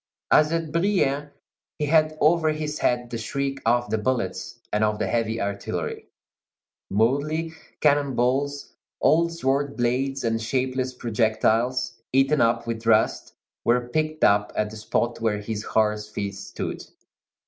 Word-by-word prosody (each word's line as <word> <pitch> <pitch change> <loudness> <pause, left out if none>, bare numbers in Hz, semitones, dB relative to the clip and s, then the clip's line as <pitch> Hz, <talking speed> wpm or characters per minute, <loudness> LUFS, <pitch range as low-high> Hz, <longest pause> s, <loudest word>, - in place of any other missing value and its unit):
As 155 0 +5
at 165 -2 -1
Brienne, 160 -5 +1 0.5
he 150 - -1
had 155 0 +3
over 160 +1 +4
his 155 -1 -3
head 120 0 0
the 115 - -3
shriek 135 +3 -3
of 120 +1 +2
the 110 - +1
bullets 125 +3 -2
and 105 +1 +2
of 105 0 +1
the - - -1
heavy 115 -1 -1
artillery. 100 0 -4 0.8
Mouldy 145 +10 +1 0.3
cannon 145 -3 +3
balls, 140 +4 0 0.3
old 170 +2 +3
sword 140 -3 -1
blades, 130 +3 0
and 115 -1 0
shapeless 130 +2 -1
projectiles, 115 +2 0
eaten 135 +3 +3
up 115 0 +2
with 115 -1 -4
rust, 110 -1 +2 0.3
were 120 +1 +1
picked 155 +2 -1
up 105 0 +4
at 105 0 -1
the 110 - -8
spot 115 +2 -1
where 110 -2 +1
his 105 0 -4
horse's 105 -1 0
feet 100 -2 -4
stood. 95 - -6
125 Hz, 145 wpm, -24 LUFS, 115-145 Hz, 0.8 s, As